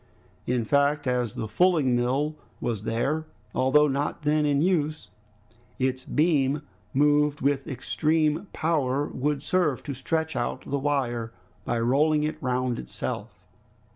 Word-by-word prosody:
In 125 Hz, -2 st, 0 dB
fact 145 Hz, +1 st, +2 dB
as 125 Hz, -3 st, 0 dB
the 110 Hz, -, -3 dB
fulling 150 Hz, +1 st, +3 dB
mill 135 Hz, +6 st, 0 dB, 0.2 s
was 110 Hz, -3 st, -3 dB
there, 145 Hz, +8 st, -1 dB, 0.3 s
although 150 Hz, +3 st, +4 dB
not 145 Hz, +3 st, -2 dB
then 150 Hz, 0 st, +2 dB
in 140 Hz, -1 st, +2 dB
use, 155 Hz, -2 st, 0 dB, 0.7 s
its 130 Hz, 0 st, -1 dB
beam 150 Hz, -2 st, +2 dB, 0.3 s
moved 145 Hz, +1 st, +3 dB
with 140 Hz, +1 st, +1 dB
extreme 155 Hz, +4 st, 0 dB
power 145 Hz, -4 st, 0 dB
would 140 Hz, +1 st, -1 dB
serve 155 Hz, -6 st, +1 dB
to 145 Hz, -, -4 dB
stretch 160 Hz, +5 st, -2 dB
out 120 Hz, -, -2 dB
the 140 Hz, -, -1 dB
wire 125 Hz, -5 st, -1 dB, 0.3 s
by 120 Hz, -, 0 dB
rolling 150 Hz, +6 st, +3 dB
it 155 Hz, -, -3 dB
round 125 Hz, -1 st, -1 dB
itself. 60 Hz, -, -6 dB
145 Hz, 135 wpm, -26 LUFS, 130-150 Hz, 0.7 s, although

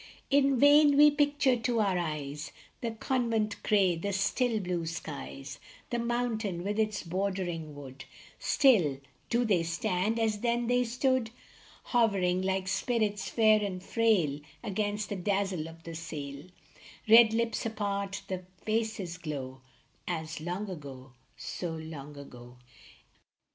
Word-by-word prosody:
In 275 Hz, -1 st, +4 dB
vain 290 Hz, +1 st, +6 dB
we 295 Hz, 0 st, +8 dB
picture 290 Hz, -3 st, +2 dB
to 230 Hz, 0 st, 0 dB
our 200 Hz, -3 st, +2 dB
eyes 150 Hz, -3 st, -4 dB, 0.3 s
The 235 Hz, -, -1 dB
convent 225 Hz, -2 st, -1 dB
gray, 195 Hz, -4 st, +3 dB
the 200 Hz, +5 st, -3 dB
still, 225 Hz, +4 st, +1 dB
blue 175 Hz, -3 st, -2 dB
skies, 70 Hz, -, -7 dB, 0.3 s
The 240 Hz, -, 0 dB
mountain 235 Hz, -6 st, -1 dB
with 205 Hz, +3 st, -2 dB
its 215 Hz, -1 st, 0 dB
bordering 175 Hz, -4 st, -3 dB
wood; 135 Hz, -1 st, -10 dB, 0.3 s
Still 185 Hz, -, +3 dB, 0.3 s
do 240 Hz, +1 st, +2 dB
they 195 Hz, -6 st, +3 dB
stand 180 Hz, +6 st, -1 dB
as 220 Hz, -2 st, 0 dB
then 235 Hz, +1 st, 0 dB
they 245 Hz, +1 st, +2 dB
stood, 250 Hz, 0 st, +1 dB, 0.5 s
Hovering 195 Hz, -7 st, +2 dB
like 190 Hz, 0 st, -1 dB
spirits 210 Hz, 0 st, 0 dB
fair 215 Hz, -2 st, +4 dB
and 185 Hz, -2 st, -4 dB
frail 195 Hz, -13 st, +2 dB, 0.2 s
Against 205 Hz, 0 st, -2 dB
the 205 Hz, -, -2 dB
dazzle 195 Hz, -3 st, -1 dB
of 165 Hz, 0 st, -14 dB
the 165 Hz, -, -7 dB
sail; 150 Hz, -3 st, -6 dB, 0.6 s
The 225 Hz, +1 st, +8 dB
red 230 Hz, -2 st, +7 dB
lips 230 Hz, 0 st, 0 dB
part, 200 Hz, -1 st, -2 dB
the 185 Hz, -1 st, -3 dB, 0.2 s
faces 215 Hz, -5 st, -2 dB
glow, 135 Hz, -5 st, -6 dB, 0.5 s
As 160 Hz, -2 st, -4 dB
long 180 Hz, +5 st, -3 dB
ago, 140 Hz, -7 st, -9 dB, 0.2 s
so 170 Hz, -3 st, -4 dB
long 150 Hz, -3 st, -8 dB
ago 125 Hz, -3 st, -12 dB
200 Hz, 135 wpm, -30 LUFS, 165-230 Hz, 0.6 s, we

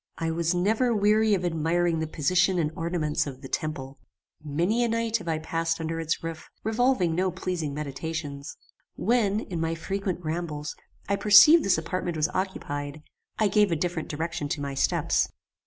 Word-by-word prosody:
"I 165 Hz, 0 st, -1 dB
was 170 Hz, +1 st, 0 dB
never 220 Hz, +6 st, +2 dB
weary 210 Hz, +1 st, +4 dB
of 180 Hz, -2 st, -2 dB
admiring 165 Hz, 0 st, +1 dB
the 160 Hz, -, -2 dB
position 180 Hz, +5 st, +2 dB
and 155 Hz, -3 st, 0 dB
ornaments 165 Hz, -4 st, -1 dB
of 135 Hz, -1 st, -8 dB
THE -, -, -6 dB
TEMPLE. 135 Hz, -2 st, -4 dB, 0.4 s
Many 170 Hz, +11 st, +1 dB
a -, -, +2 dB
night 230 Hz, 0 st, 0 dB
have 190 Hz, -6 st, -11 dB
I 160 Hz, -1 st, 0 dB
passed 165 Hz, +1 st, -2 dB
under 165 Hz, 0 st, -3 dB
its 160 Hz, 0 st, -2 dB
roof, 165 Hz, -1 st, -6 dB
revolving 220 Hz, -5 st, +2 dB
no 185 Hz, +3 st, +1 dB
pleasing 180 Hz, -4 st, -3 dB
meditations. 150 Hz, 0 st, -5 dB, 0.4 s
When, 220 Hz, -2 st, +1 dB
in 175 Hz, -6 st, -4 dB
my 165 Hz, 0 st, -1 dB
frequent 190 Hz, 0 st, -3 dB
rambles, 155 Hz, -2 st, -3 dB, 0.3 s
I 200 Hz, -, +1 dB
perceived 215 Hz, +13 st, +8 dB
this 195 Hz, -, +3 dB
apartment 175 Hz, +1 st, -3 dB
was 155 Hz, -, +1 dB
occupied, 150 Hz, -6 st, -4 dB, 0.3 s
I 215 Hz, -, +3 dB
gave 205 Hz, -1 st, +3 dB
a -, -, +2 dB
different 170 Hz, 0 st, -2 dB
direction 160 Hz, -1 st, -3 dB
to 145 Hz, -, -2 dB
my 140 Hz, -1 st, -3 dB
steps. 135 Hz, -, +1 dB
170 Hz, 170 wpm, -26 LUFS, 155-195 Hz, 0.4 s, perceived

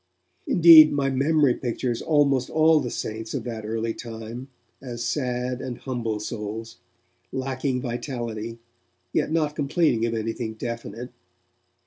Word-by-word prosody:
Indeed, 160 Hz, -3 st, +9 dB
my 140 Hz, -1 st, 0 dB
memory 140 Hz, 0 st, +3 dB
pictures 120 Hz, -1 st, -3 dB
almost 140 Hz, -4 st, +2 dB
all 160 Hz, 0 st, +4 dB
the 125 Hz, -4 st, -3 dB
'saints' 110 Hz, 0 st, -5 dB
of -, -, -3 dB
that 115 Hz, -3 st, -6 dB
early 115 Hz, +1 st, -2 dB
time 115 Hz, +2 st, -8 dB, 0.3 s
as 120 Hz, -3 st, -6 dB
sad 125 Hz, -1 st, -2 dB
and 125 Hz, -2 st, -5 dB
humble 115 Hz, -5 st, -3 dB
souls, 105 Hz, 0 st, -6 dB, 0.5 s
lacking 130 Hz, 0 st, -2 dB
vitality, 120 Hz, -3 st, -4 dB, 0.6 s
yet -, -, +1 dB
not 155 Hz, -2 st, 0 dB
complaining 145 Hz, -6 st, +1 dB
of 115 Hz, -, -2 dB
anything 115 Hz, 0 st, -3 dB
definite. 115 Hz, +1 st, -6 dB
125 Hz, 125 wpm, -25 LUFS, 115-140 Hz, 0.6 s, Indeed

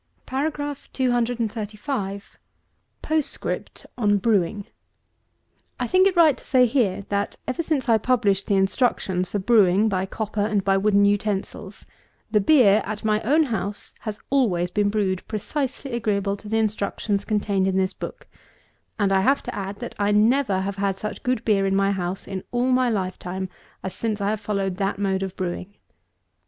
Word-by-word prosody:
235. 245 Hz, -6 st, -2 dB, 0.7 s
POSTSCRIPT 310 Hz, -2 st, -2 dB
on 205 Hz, -2 st, +3 dB
brewing. 200 Hz, -1 st, +1 dB, 1.1 s
I -, -, 0 dB
think 370 Hz, +1 st, +4 dB
it 380 Hz, -, 0 dB
right 320 Hz, -5 st, +6 dB
to -, -, -16 dB
say 255 Hz, -2 st, +4 dB
here, 220 Hz, -6 st, +1 dB
that, 200 Hz, 0 st, -1 dB
ever 255 Hz, +6 st, -1 dB
since 305 Hz, -6 st, -1 dB
I 225 Hz, -2 st, +4 dB
published 210 Hz, -5 st, +1 dB
the 200 Hz, -, +2 dB
instructions 190 Hz, -2 st, +1 dB
for -, -, -2 dB
brewing 205 Hz, -1 st, +4 dB
by 190 Hz, -1 st, -1 dB
copper 215 Hz, +1 st, -3 dB
and 210 Hz, -2 st, 0 dB
by 195 Hz, 0 st, +3 dB
wooden 200 Hz, +1 st, +4 dB
utensils, 205 Hz, 0 st, -2 dB, 0.5 s
the 210 Hz, -, +3 dB
beer 215 Hz, -4 st, +5 dB
at 210 Hz, +1 st, -5 dB
my 215 Hz, 0 st, +2 dB
own 300 Hz, +8 st, +3 dB
house 220 Hz, -6 st, -4 dB
has 215 Hz, -2 st, -5 dB
always 185 Hz, -11 st, +2 dB
been 205 Hz, +1 st, +1 dB
brewed 195 Hz, -3 st, 0 dB
precisely 270 Hz, +5 st, -3 dB
agreeable 205 Hz, -4 st, 0 dB
to 205 Hz, +1 st, -11 dB
the 225 Hz, -, +1 dB
instructions 205 Hz, -1 st, -1 dB
contained 200 Hz, -3 st, 0 dB
in 190 Hz, 0 st, +1 dB
this 190 Hz, -1 st, +1 dB
book; -, -, -8 dB, 0.7 s
and 200 Hz, -2 st, +1 dB
I 190 Hz, 0 st, +4 dB
have 275 Hz, +8 st, +2 dB
to -, -, -5 dB
add, 195 Hz, 0 st, -4 dB
that -, -, -5 dB
I 205 Hz, 0 st, +2 dB
never 215 Hz, -1 st, +3 dB
have 195 Hz, +1 st, -3 dB
had 195 Hz, -1 st, 0 dB
such 215 Hz, -, -5 dB
good 250 Hz, -3 st, -1 dB
beer 195 Hz, -3 st, +3 dB
in 195 Hz, -, +1 dB
my 195 Hz, 0 st, +3 dB
house 185 Hz, -1 st, -3 dB
in 190 Hz, -1 st, -5 dB
all 245 Hz, +1 st, +1 dB
my 255 Hz, -1 st, +3 dB
lifetime, 185 Hz, -2 st, -3 dB, 0.3 s
as 190 Hz, -, -4 dB
since 215 Hz, +1 st, -2 dB
I 200 Hz, +1 st, 0 dB
have 215 Hz, -1 st, -3 dB
followed 195 Hz, -3 st, -2 dB
that 195 Hz, 0 st, -1 dB
mode 195 Hz, -1 st, 0 dB
of 190 Hz, -1 st, -4 dB
brewing. 185 Hz, +2 st, -4 dB
205 Hz, 170 wpm, -24 LUFS, 195-235 Hz, 1.1 s, right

